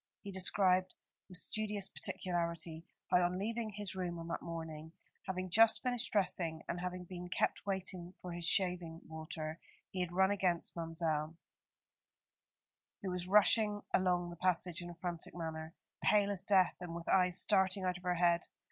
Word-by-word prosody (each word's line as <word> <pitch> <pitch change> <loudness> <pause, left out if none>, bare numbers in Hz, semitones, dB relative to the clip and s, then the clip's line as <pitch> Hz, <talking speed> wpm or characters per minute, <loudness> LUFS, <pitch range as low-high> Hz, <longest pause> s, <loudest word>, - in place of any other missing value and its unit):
He 200 - -6
described, 185 0 +3 0.3
with 180 - -2
studious 210 0 0
particularity, 170 -3 -2 0.2
how 180 -1 +6
on 175 +1 +1
leaving 225 +3 -2
his 205 -1 -4
room 180 -2 -3
on 165 0 -7
that - - -2
morning, 160 -1 -6 0.3
having 185 0 -2
just 225 +3 +5
finished 245 -2 0
dressing, 170 -5 0
and 175 - -2
having 180 0 -4
been 180 0 -7
kept 195 - 0
waiting 185 -2 -3
for 180 - -7
his 175 0 -5
shaving 175 -3 0
water, 160 0 -5 0.3
he 185 - -4
had 180 -1 -2
run 190 +2 +4
against 180 -4 +1
Ma'mselle, 165 -1 -1 1.7
who 190 - -2
was 180 0 -3
rushing 210 +1 +4
along 180 -2 +2
the - - -7
passage 180 0 +1
in 175 - -7
a 175 - -8
frantic 170 -1 -3
manner, 160 0 -5 0.3
pale 205 -1 +4
as 195 -3 0
death, 190 -3 +4
and 175 -2 -6
with 170 0 -7
eyes 180 -1 +4
starting 190 -1 +3
out 180 -1 0
of - - -19
her 180 -1 +1
head. 170 -1 +3
180 Hz, 165 wpm, -35 LUFS, 170-190 Hz, 1.7 s, how